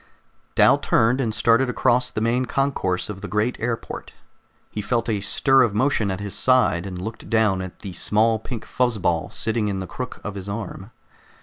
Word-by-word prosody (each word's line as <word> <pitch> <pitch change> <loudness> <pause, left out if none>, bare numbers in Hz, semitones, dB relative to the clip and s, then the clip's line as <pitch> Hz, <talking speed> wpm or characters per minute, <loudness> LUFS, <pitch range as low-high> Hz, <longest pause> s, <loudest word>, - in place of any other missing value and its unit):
Dal - - +5
turned 120 +4 +2
and 115 -4 0
started 115 +4 +3
across 125 0 +2
the 110 - -4
main 125 +2 +1
concourse 130 -9 -1
of 95 -2 -7
the 105 - -5
great 105 +6 0
airport. 115 0 -4 0.6
He 105 - -3
felt 115 +3 -1
a 105 -3 0
stir 135 +6 +3
of 115 -5 +2
motion 115 -3 +1
at 95 0 -3
his 100 -1 -5
side, 115 -8 +2
and 90 -2 -6
looked 110 +5 -7
down 110 -5 +2
at 95 -1 -8
the 100 -4 -7
small 110 +5 +2
pink 115 0 -7
fuzz 125 -3 0
ball 85 -4 0
sitting 110 -1 -1
in 100 -2 -2
the 95 - -4
crook 125 +6 -6
of 105 - -4
his 100 0 -7
arm. 100 -1 -6
110 Hz, 195 wpm, -23 LUFS, 100-120 Hz, 0.6 s, Dal